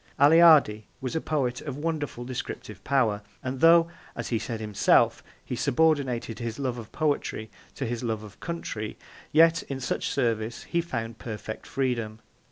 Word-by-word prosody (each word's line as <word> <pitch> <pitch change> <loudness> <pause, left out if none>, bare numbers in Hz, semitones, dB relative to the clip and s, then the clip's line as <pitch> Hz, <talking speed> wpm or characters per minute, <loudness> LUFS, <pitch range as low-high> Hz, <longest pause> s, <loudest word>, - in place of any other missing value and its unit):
Aleardi 145 -8 +6
was 130 +2 -4
a 160 - 0
poet 130 -6 -1
of 140 -3 -5
wonderful 145 -6 -3
descriptive 130 -1 -6
power, 115 -7 +2 0.2
and 130 0 -3
though, 165 +1 +7 0.3
as - - -4
he 115 - 0
said 115 0 -4
himself, 105 -2 +3 0.2
he - - -3
subordinated 135 -6 +1
his 115 -1 -4
love 130 -3 -2
of 110 - -10
poetry 145 -8 -1 0.2
to 135 - -3
his 120 0 -3
love 110 -2 -2
of 105 -1 -13
country, 115 -10 -5 0.3
yet 165 +3 +5
in 135 -9 -6
such 130 - -2
service 115 -3 -1
he 170 - 0
found 115 -8 -5
perfect 110 -1 -6
freedom. 120 -5 -1
125 Hz, 160 wpm, -27 LUFS, 115-150 Hz, 0.3 s, though